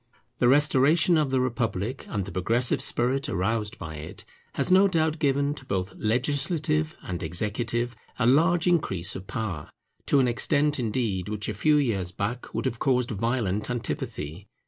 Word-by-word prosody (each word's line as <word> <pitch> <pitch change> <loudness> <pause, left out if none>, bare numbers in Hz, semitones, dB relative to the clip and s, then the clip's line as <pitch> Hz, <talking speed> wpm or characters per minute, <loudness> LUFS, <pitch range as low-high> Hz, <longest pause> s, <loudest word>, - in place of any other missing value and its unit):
The 120 - +4
restoration 150 +5 +4
of 155 -3 +2
the 130 0 +1
republic 120 -1 -2
and 100 -3 -2
the 100 - -8
progressive 115 +7 +2
spirit 130 +3 +1
aroused 105 +4 -1
by 80 -1 -7
it 75 - -8 0.3
has - - 0
no 190 +2 +6
doubt 160 -3 0
given 140 0 +1
to 140 - -11
both 95 -5 -3
legislative 150 +7 0
and 90 -2 -5
executive 115 +8 -2 0.2
a 125 - +1
large 165 +7 +4
increase 125 - 0
of 95 0 -8
power: 100 -11 -4 0.4
to 140 - +4
an 130 - +3
extent 145 +4 +1
indeed 105 -6 -1
which 105 -1 -3
a 110 - -2
few 150 +9 +3
years 100 -11 0
back 105 +6 -4
would - - -3
have 115 - -2
caused 125 -2 +1
violent 110 -2 -1
antipathy. 95 -7 -4
120 Hz, 165 wpm, -26 LUFS, 100-145 Hz, 0.4 s, no